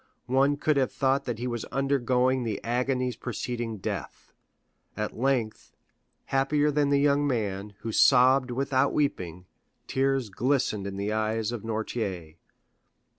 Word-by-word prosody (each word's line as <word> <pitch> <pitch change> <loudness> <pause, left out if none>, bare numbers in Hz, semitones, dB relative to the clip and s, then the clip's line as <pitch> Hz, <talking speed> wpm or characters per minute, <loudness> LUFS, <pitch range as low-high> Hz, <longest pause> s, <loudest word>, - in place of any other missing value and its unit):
One 135 +3 +2
could 150 0 +1
have 130 -2 +1
thought 135 0 +1
that 120 -3 -3
he 120 - -4
was 120 -2 -3
undergoing 130 -2 +1
the 110 -4 -2
agonies 125 +1 0
preceding 120 -1 -4
death. 95 - -6 0.6
At 105 0 -3
length, 120 -3 -1 0.5
happier 145 +2 +1
than 145 -1 +1
the 140 - +3
young 145 0 +3
man, 105 -5 -2
who 115 - -4
sobbed 130 +2 +5
without 135 +2 +1
weeping, 90 - -2 0.4
tears 135 -4 0
glistened 120 -4 0
in 95 -1 -6
the 100 +2 -2
eyes 110 +1 -1
of 120 -3 -4
Noirtier. 110 -7 -4
125 Hz, 135 wpm, -27 LUFS, 110-135 Hz, 0.6 s, sobbed